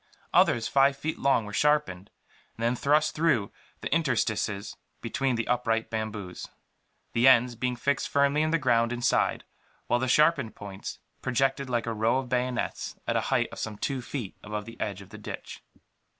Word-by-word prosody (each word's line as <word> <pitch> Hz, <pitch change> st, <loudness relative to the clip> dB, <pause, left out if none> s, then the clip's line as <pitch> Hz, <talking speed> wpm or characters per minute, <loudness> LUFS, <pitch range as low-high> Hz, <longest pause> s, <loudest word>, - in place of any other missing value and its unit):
Others, 115 Hz, -2 st, +4 dB
five 140 Hz, 0 st, +3 dB
feet 155 Hz, +3 st, -3 dB
long, 135 Hz, -5 st, +2 dB
were 105 Hz, -, -8 dB
sharpened 150 Hz, -10 st, +1 dB, 0.5 s
and 115 Hz, -, -5 dB
then 120 Hz, +2 st, +2 dB
thrust 150 Hz, +4 st, +2 dB
through 150 Hz, -11 st, +1 dB, 0.3 s
the -, -, -2 dB
interstices 110 Hz, -9 st, 0 dB, 0.2 s
between 130 Hz, +2 st, -1 dB
the 115 Hz, -1 st, -2 dB
upright 115 Hz, -2 st, 0 dB
bamboos; 105 Hz, -5 st, -4 dB, 0.7 s
the 120 Hz, +3 st, +4 dB
ends 125 Hz, -1 st, +6 dB
being 125 Hz, +2 st, -2 dB
fixed 140 Hz, +3 st, -1 dB
firmly 140 Hz, +1 st, +3 dB
in 155 Hz, -, +1 dB
the 165 Hz, -, +3 dB
ground 120 Hz, -5 st, +2 dB
inside, 120 Hz, 0 st, +1 dB, 0.4 s
while 120 Hz, -, +1 dB
the 130 Hz, -, -1 dB
sharpened 150 Hz, -3 st, +3 dB
points 100 Hz, -1 st, -7 dB, 0.2 s
projected 135 Hz, +1 st, 0 dB
like 120 Hz, -2 st, 0 dB
a 115 Hz, -, -2 dB
row 110 Hz, +3 st, +2 dB
of 130 Hz, -2 st, -3 dB
bayonets, 125 Hz, 0 st, -2 dB
at -, -, -1 dB
a -, -, +2 dB
height -, -, +2 dB
of -, -, -8 dB
some 110 Hz, -1 st, -4 dB
two 135 Hz, +4 st, -2 dB
feet 120 Hz, -5 st, -5 dB
above 105 Hz, 0 st, -5 dB
the 115 Hz, -, -11 dB
edge 100 Hz, -2 st, -3 dB
of 95 Hz, -, -17 dB
the -, -, -9 dB
ditch. -, -, -8 dB
120 Hz, 180 wpm, -28 LUFS, 110-140 Hz, 0.7 s, ends